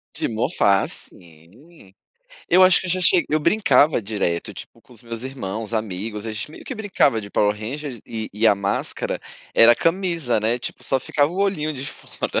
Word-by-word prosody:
De - - -1
"morfar", 110 - +1
sim. 95 - -12 0.6
Eu 185 +2 +6
acho 185 0 +6
que - - -6
eu - - -2
já 185 +2 +1
cheguei 180 -1 +5
eu 155 - +2
brincava 150 - +3
direto, 100 -5 -2
tipo - - -11
com 125 - -19
meus 115 0 -6
irmãos, 115 -5 -5
amigos, 105 0 -3
a 110 - -4
gente 110 +7 -5
meio - - -12
que 260 - -5
brincava 195 - +1
de 100 -2 -7
Power 105 0 +2
Ranger, 130 +4 -6
e 110 -1 -5
e 105 +3 +1
a 105 - +6
máscara 100 0 -2 0.4
era 115 +1 +8
a - - +2
camisa, 165 - 0
né, 115 +3 0
tipo, - - -6
só 135 -1 0
ficava 145 +2 +1
o 180 - -7
olhinho 170 -6 0
de 130 -1 -6
fora. - - -4
120 Hz, 195 wpm, -22 LUFS, 105-160 Hz, 0.6 s, era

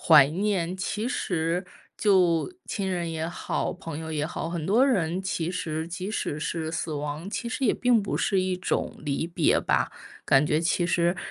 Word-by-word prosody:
怀 150 -4 +8
念。 185 0 0
其 210 +4 -2
实 175 - -1 0.3
就 185 - +3
亲 195 -2 -2
人 175 -2 -1
也 160 0 -2
好、 175 - -2
朋 165 -4 -7
友 160 0 -6
也 150 -1 -1
好， 165 0 -4
很 170 -2 -3
多 225 +7 +5
人 185 -9 +1
其 175 -3 -2
实 160 -3 -3
即 180 +3 -5
使 150 -8 -2
是 160 0 -2
死 160 0 -2
亡， 150 +5 -4
其 235 +2 -3
实 275 +2 -2
也 225 - +4
并 245 -3 +3
不 195 - -2
是 195 -2 +2
一 185 0 0
种 180 - -2
离 145 +2 -2
别 170 -2 +3
吧。 - - +1 0.3
感 135 +2 +5
觉 150 +1 +2
其 175 +1 +1
实 175 0 +2
175 Hz, 200 characters per minute, -26 LUFS, 160-190 Hz, 0.3 s, 怀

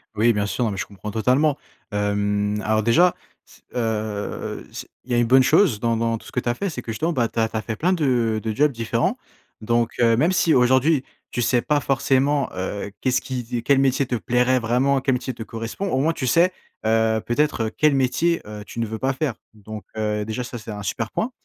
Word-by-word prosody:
Oui, 115 +3 +4
bien 105 -1 0
sûr. 100 +5 -1
Non 110 - 0
mais 100 - -5
je 90 - -2
comprends 100 +1 -8
totalement. 130 +7 +2 0.3
Hem, 105 0 0
alors 110 0 +1
déjà, 170 - +4 0.3
c - - -20
heu, 110 -3 -3
c - - -8 0.2
il 130 - -10
y - - +2
a - - +2
une 120 -1 +3
bonne 130 +2 +6
chose 150 - +4
dans 115 0 +1
dans 115 0 0
tout - - -16
ce - - -11
que - - -1
tu 120 - -2
as - - +2
fait. 200 +11 -3
C'est 135 -7 -6
que, - - -25
bah, - - -2
justement, 160 +10 -1
tu 115 - -5
as 110 - +3
tu - - -11
as - - -1
fait 110 0 -4
plein 180 - +1
de 125 -9 +1
de 110 -1 -2
jobs 150 +5 +3
différents. 120 - -1 0.4
Donc 115 +1 +1
heu, 115 -1 +4
même 160 +8 +3
si 170 -3 +3
aujourd'hui, 130 +4 +3 0.3
tu 120 - -2
sais 120 +1 +2
pas 150 +2 +1
forcément, 135 +1 +1
heu, 100 +2 -4
qu'est-ce 130 -1 +1
qui 120 -2 -4
quel 135 +2 +3
métier 135 0 +2
te 125 - -2
plairait 125 +2 +2
vraiment, 125 +4 +1
quel 135 0 +1
métier 125 +1 -3
te 115 - -7
correspond, 115 - -5
au 130 - +1
moins 160 +3 +2
tu 130 -5 -3
sais, 170 +8 +4 0.3
heu, 110 0 +2
peut-être, 135 -1 +1
heu, 110 - -3
quel 150 -2 +4
métier, 160 +6 +1
heu, 105 0 -7
tu 115 - -8
ne 115 - 0
veux 110 0 -5
pas 135 0 0
faire. 135 -1 -1 0.2
Donc, 110 0 -9
heu, 105 -1 -1
déjà 110 +3 -3
ça, 120 0 -7
c'est 115 0 -8
un 105 -1 -6
super 110 +3 -3
point. 235 - -2
120 Hz, 240 wpm, -22 LUFS, 110-135 Hz, 0.4 s, bonne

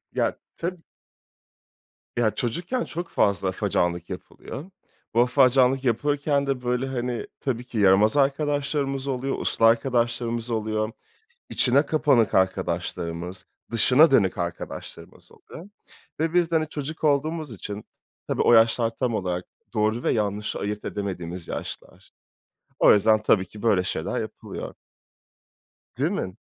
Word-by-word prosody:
Ya - - +1 0.2
tabii. 175 0 -4 1.4
Ya, 115 -2 +3
çocukken 175 - -2
çok 175 +1 -5
fazla 100 -1 +1
afacanlık 90 -3 -1
yapılıyor. 140 - -8 0.5
Bu 115 - +2
afacanlık 130 +1 +4
yapılırken 140 +3 +1
de 135 -2 -1
böyle, 125 +1 -1
hani, 125 -2 -3
tabii, 125 -3 -2
ki 125 - -7
yaramaz 105 +5 +5
arkadaşlarımız 140 -1 0
oluyor, 135 0 -1
uslu 115 - +1
arkadaşlarımız 120 0 +1
oluyor, 110 0 -1 0.6
içine 135 +4 +3
kapanık 135 -8 +3
arkadaşlarımız, 90 -1 -1 0.3
dışına 130 +7 +5
dönük 100 -8 +3
arkadaşlarımız 85 -1 -7
oluyor 175 +5 -13 0.5
ve 160 +1 0
biz 175 -1 +2
de, - - +2
hani, 155 -1 -2
çocuk 155 +2 -6
olduğumuz 155 -1 0
için, 105 +1 -7 0.4
tabii, - - 0
o - - +5
yaşlar 115 0 +5
tam 125 -4 0
olarak 90 -3 -2 0.3
doğru 110 +2 0
ve - - +2
yanlışı 105 -1 -1
ayırt 105 +1 -4
edemediğimiz 90 -4 -5
yaşlar. - - -7 0.7
O - - +7
yüzden, 110 +1 +4
tabii, 95 -3 +3
ki 105 +3 -13
böyle 105 -6 +3
şeyler - - -2
yapılıyor. - - -7 1.2
Değil - - +1
mi? 95 - -3
120 Hz, 125 wpm, -25 LUFS, 105-140 Hz, 1.4 s, O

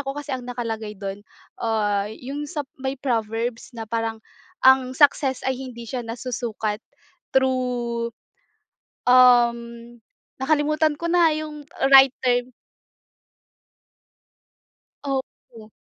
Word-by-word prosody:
ako 275 0 -5
kasi 290 -1 -5
ang 250 -1 -5
nakalagay 225 -4 -4
do'n, 195 0 -6 0.4
ah, 210 -3 0
'yung 275 +6 -6
sa 295 0 -4 0.2
may 265 +1 -3
Proverbs 230 -2 -2
na 225 - -5
parang 225 0 -2 0.5
ang 260 0 +5
success 280 -2 +3
ay 265 - +1
hindi 245 -3 -8
siya 250 +2 -4
nasusukat 230 -2 -4 0.6
through, 250 -3 0 1.0
um, 245 -1 +6 0.8
nakalimutan 305 +1 +2
ko 335 - -4
na 340 -1 +4
'yung 305 -1 -6 0.3
right 270 -1 +9
term. 245 0 +1 2.5
Opo. 260 -5 -6
250 Hz, 100 wpm, -23 LUFS, 230-270 Hz, 2.5 s, right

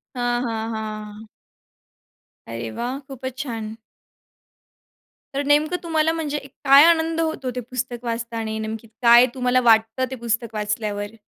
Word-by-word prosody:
हां, 245 0 0
हां, 225 -1 -3
हां. 215 0 -6 1.2
अरे 115 0 -5
वाह! 245 - -4
खूपच 260 -1 -7
छान. 225 -6 -4 1.6
तर 280 - 0
नेमकं 300 +4 +3
तुम्हाला 320 -1 +1
म्हणजे 310 -3 -2
एक 275 -1 -8
काय 275 +2 +8
आनंद 330 -1 +3
होतो 315 -5 -2
ते - - -1
पुस्तक 245 0 -5
वाचताना 230 0 -3
आणि 220 0 -3
नेमकी 220 +1 -6
काय 240 +1 +8
तुम्हाला 250 0 +2
वाटतं 225 +1 +3
ते 260 - -5
पुस्तक 230 -1 -2
वाचल्यावर? 210 0 -3
240 Hz, 140 wpm, -22 LUFS, 220-275 Hz, 1.6 s, काय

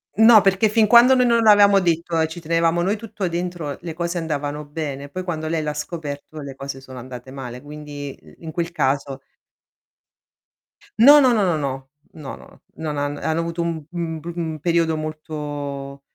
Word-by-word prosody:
No, 220 +1 +8
perché 195 +2 +3
fin 215 0 +3
quando 240 +4 +7
noi 250 -1 +4
non 235 -1 +3
l'avevamo 205 -2 +6
detto 170 -2 0
e 160 - +2
ci 160 +2 -8
tenevamo 165 +1 +1
noi 195 +4 +1
tutto 210 -3 -4
dentro, 170 -4 -4
le 165 -2 -6
cose 170 +2 -3
andavano 150 -2 -3
bene, 145 -2 -5
poi 185 +5 -5
quando 160 -3 -4
lei 160 0 -1
l'ha 150 -1 -3
scoperto 150 -1 -6
le 140 -2 -8
cose 135 0 -7
sono 130 -1 -11
andate 125 0 -9
male, 125 -2 -8
quindi 145 -1 -8
i - - -18
in 160 -1 -7
quel 170 0 -3
caso 135 -3 -1 1.8
No, 290 +5 +9
no, 260 -2 +5
no, 220 -4 +2
no, 175 -3 +1
no. 135 -2 -4 0.2
No, 150 -4 -8
no. - - -17
Non 155 -2 -4
han 145 0 -2
hanno 160 +2 -1
avuto 170 0 -3
un 165 -3 -3
mhmm, 170 -1 -4
un - - -6
br 165 - -8
mhmm, 160 -2 -3
periodo 165 +1 +1
molto 145 -3 -6
160 Hz, 190 wpm, -22 LUFS, 145-175 Hz, 1.8 s, No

